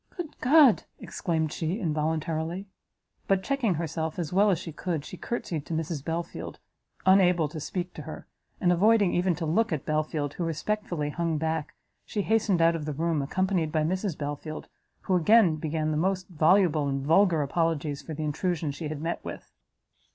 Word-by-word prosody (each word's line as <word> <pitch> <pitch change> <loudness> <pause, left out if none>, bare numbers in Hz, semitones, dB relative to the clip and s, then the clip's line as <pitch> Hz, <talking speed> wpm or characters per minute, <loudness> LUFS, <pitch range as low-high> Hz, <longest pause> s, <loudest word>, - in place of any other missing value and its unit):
"Good 335 -4 -5
God! 275 -3 +6
" - - -42
exclaimed 160 -4 -1
she, 170 +6 -2
involuntarily; 160 +1 -2 0.6
but, 195 -1 +2
checking 260 -9 +1
herself 160 0 -3
as 170 -2 -3
well 205 +3 +5
as 185 - +3
she 165 - -7
could, 160 -1 -3
she - - -8
courtsied 175 -7 -4
to 165 - -3
Mrs 160 -2 -3
Belfield, 165 +2 -4 0.5
unable 180 -4 +5
to 155 - -6
speak 180 +3 -4
to - - -7
her, - - -8 0.3
and 180 -5 +3
avoiding 205 +1 +4
even 175 0 +2
to 165 +1 -4
look 200 +8 +1
at 150 -5 -2
Belfield, 155 -2 -1
who 175 - -4
respectfully 165 -1 -2
hung 165 -1 -1
back, 160 0 -2 0.3
she 205 - -3
hastened 210 -6 +2
out 165 0 +4
of 155 -3 -4
the 150 - -3
room: 160 +1 0
accompanied 180 +2 0
by 155 -1 +1
Mrs 185 +1 -1
Belfield, 145 +1 -5 0.3
who 190 - 0
again 180 -2 +5
began 155 0 -1
the 150 - 0
most 185 +2 0
voluble 160 -2 +3
and 135 0 -2
vulgar 165 -1 +4
apologies 150 -1 -1
for 155 +2 -7
the 155 - -4
intrusion 155 +1 -1
she 145 +3 -5
had 150 0 -5
met 170 +1 -3
with. - - -8
165 Hz, 180 wpm, -27 LUFS, 155-185 Hz, 0.6 s, God